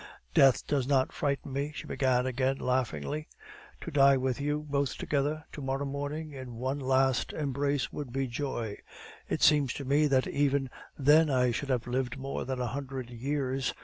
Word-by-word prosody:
Death 135 - +5
does 135 -3 0
not 135 -2 +2
frighten 140 -1 -2
me," 140 +2 -2
she - - -6
began 130 -2 +1
again, 130 +1 0
laughingly. 130 - -1 0.5
"To 170 - -6
die 140 -2 +6
with 130 0 -1
you, 150 +1 -1
both 140 -1 -1
together, 150 +2 -1
to 150 - -8
morrow 135 +1 -2
morning, 145 +3 -4
in 130 -3 -8
one 130 +4 -2
last 130 -1 +2
embrace, 140 -1 -1
would 145 -5 -5
be 135 +2 -1
joy. 120 -4 -4 0.5
It - - -1
seems 145 -4 +5
to 140 - -6
me 145 +3 +3
that 135 -2 +3
even 140 -2 +1 0.3
then 150 +3 +5
I 125 -2 +3
should 140 +4 -3
have 125 -3 0
lived 125 +1 -2
more 135 +1 -4
than 130 -1 -3
a 125 - 0
hundred 130 -3 -5
years. 135 +1 -2
135 Hz, 180 wpm, -30 LUFS, 130-145 Hz, 0.5 s, die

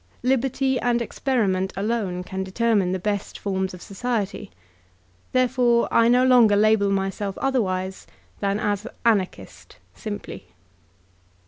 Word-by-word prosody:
Liberty 265 +1 +1
and 240 0 +1
experiment 210 -7 -1
alone 200 -4 -2
can 190 +1 -4
determine 200 -1 +1
the 185 - 0
best 200 +2 -3
forms 190 -1 -2
of 180 -1 -11
society. 210 -1 -3 0.8
Therefore 250 -2 +2
I 230 - +4
no 250 +2 +4
longer 240 -5 +6
label 210 -1 +3
myself 195 0 -2
otherwise 190 -8 -1 0.3
than 200 0 0
as 205 +1 -1 0.2
"Anarchist 205 -5 -1 0.2
simply. 205 - -7
210 Hz, 115 wpm, -23 LUFS, 190-240 Hz, 0.8 s, longer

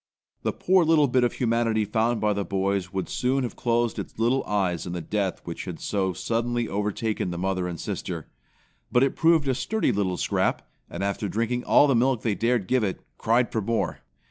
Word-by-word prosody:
The - - 0
poor 185 -1 +3
little 155 -2 +4
bit 125 -1 +2
of 120 - +1
humanity 115 -2 +1
found 110 +2 +1
by 105 0 +2
the 100 0 -1
boys 95 -1 -1
would 95 -1 -3
soon 130 +2 0
have 120 - -4
closed 120 -1 0
its - - -7
little 120 +4 +2
eyes 95 -5 -1
in 90 - -4
the 90 - -3
death 100 +2 -2
which 85 - -6
had 90 -4 -6
so 95 -2 -1
suddenly 120 +4 -1
overtaken 105 0 -2
the 85 - -4
mother 95 0 -1
and 85 -2 -5
sister. - - -4 0.6
But 125 +2 +4
it 135 - +1
proved 165 -3 +3
a 130 - +2
sturdy 220 - 0
little 95 -3 -1
scrap, - - 0 0.2
and 85 - -5
after 100 +1 -2
drinking 115 +4 -1
all - - +6
the 140 - +3
milk 125 0 +2
they 110 - +1
dared 115 0 +1
give 130 -2 +2
it, 95 -3 -2 0.2
cried 120 +2 +2
for 110 - 0
more. 115 +3 -1
110 Hz, 205 wpm, -25 LUFS, 100-125 Hz, 0.6 s, all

